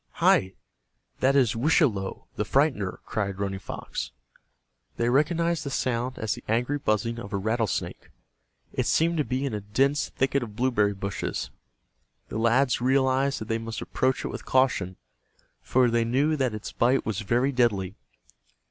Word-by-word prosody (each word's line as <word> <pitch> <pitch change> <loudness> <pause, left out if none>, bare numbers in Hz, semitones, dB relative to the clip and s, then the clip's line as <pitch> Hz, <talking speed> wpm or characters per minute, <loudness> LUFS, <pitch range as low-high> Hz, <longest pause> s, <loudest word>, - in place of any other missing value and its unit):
"Hi, 95 +1 +3 0.7
that 135 +1 +3
is 125 -6 +3
Wischalowe, 115 - +1
the - - 0
Frightener," - - +1
cried 100 -3 -2
Running 100 -1 -2
Fox. - - -5 0.9
They 120 0 +1
recognized 165 +5 +2
the 140 - -4
sound 125 -1 -1
as 110 -1 -1
the - - -9
angry 125 +6 0
buzzing 115 -1 0
of 100 -3 -8
a - - +1
rattlesnake. 110 +2 -2 0.6
It - - -1
seemed 165 +1 +2
to 150 - +2
be 130 +1 -2
in 135 - -2
a 105 - -3
dense 135 +8 +1
thicket 135 +1 0
of 110 -4 -7
blueberry 110 -4 +2
bushes, 100 0 -4 0.8
The - - -3
lads 120 +2 +3
realized 130 +1 +2
that 110 - -5
they 115 0 0
must 115 0 -5
approach 130 0 -1
it - - -2
with - - -6
caution, 125 -9 +1 0.7
for 125 -1 +3
they 115 0 +2
knew 135 +7 +2
that 130 -6 0
its 105 - -6
bite 130 +3 +2
was 110 -2 -2
very 120 +6 +1
deadly. 105 -8 +1
120 Hz, 160 wpm, -26 LUFS, 110-135 Hz, 0.9 s, Hi